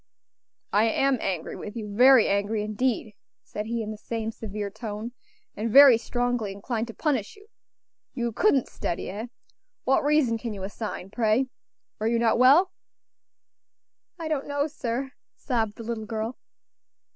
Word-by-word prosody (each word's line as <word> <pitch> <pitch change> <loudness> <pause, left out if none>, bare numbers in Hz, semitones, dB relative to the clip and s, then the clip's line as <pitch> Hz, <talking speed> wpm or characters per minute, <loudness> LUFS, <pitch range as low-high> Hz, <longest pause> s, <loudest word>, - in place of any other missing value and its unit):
"I 210 +2 +4
am 260 +3 +2
angry 180 -4 -3
with 210 - -8
you; 210 -3 -6
very 255 0 +7
angry, 205 +2 0
indeed," 215 0 -1 0.3
said 210 +1 -6
he 230 0 -2
in 215 - -5
the 215 - -8
same 225 -1 -3
severe 210 -2 -5
tone, 220 +1 -6 0.4
"and 225 +2 -2
very 265 -1 +8
strongly 245 -3 -1
inclined 225 +3 -3
to 230 - -9
punish 265 -10 -1
you. 405 0 -18 0.7
You 235 -2 -1
couldn't 270 - +2
study, 170 - -4
eh? 215 +5 -5 0.6
What 270 - +2
reason 285 -6 +2
can 230 -1 -4
you 190 - -7
assign, 195 -1 -6
pray? 230 +3 +1 0.5
Were 215 - 0
you 230 +1 +2
not 230 0 +2
well?" 290 +9 +6 1.5
"I 330 -2 -5
don't 305 -3 -2
know, 285 0 0
sir," 265 -3 -3 0.2
sobbed 225 -5 -1
the 230 - -8
little 220 -1 -4
girl. 225 +2 -4
230 Hz, 155 wpm, -26 LUFS, 215-255 Hz, 1.5 s, very